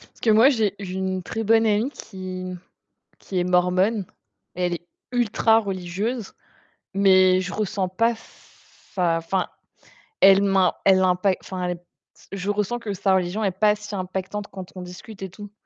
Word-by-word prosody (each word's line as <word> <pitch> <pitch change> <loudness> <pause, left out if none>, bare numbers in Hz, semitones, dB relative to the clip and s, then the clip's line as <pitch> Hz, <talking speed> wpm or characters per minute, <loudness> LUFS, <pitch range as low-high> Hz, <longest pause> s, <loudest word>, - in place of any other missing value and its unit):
Parce - - -23
que 230 - +2
moi, 225 +6 +7
j'ai 220 -7 +1
une 185 -1 -3
très 225 +4 -4
bonne 225 +1 +4
amie 220 +5 +1
qui 185 -4 -7 0.7
qui 185 -2 -3
est - - +1
mormone. 180 +3 +2 0.5
Elle 180 -1 0
est 175 +1 -11 0.2
ultra 230 -2 +3
religieuse, 195 +3 -3 0.6
mais 185 -1 +5
je 185 0 -4
ressens 195 -3 -1
pas 230 +6 +2
s 225 - -16 0.4
sa 175 -3 +2
enfin, 180 +3 -1 0.8
elle 195 0 +8
m'im 195 -3 +3
elle 190 -1 +6
impa 185 +1 +3
enfin, 185 -1 -5
elle 180 - -1
est - - -2
p 175 - -17 0.5
je 195 +1 -3
ressens 210 +3 -1
que 215 -4 -4
sa 190 0 +1
religion 185 +4 -1
est 195 - +1
pas 210 +3 +3
si 210 0 -10
impactante 190 +2 -4
quand 185 -2 -9
on 185 - -6
discute 185 +4 -10
et 190 - -4
tout, 205 +2 -11
190 Hz, 170 wpm, -23 LUFS, 185-210 Hz, 0.8 s, elle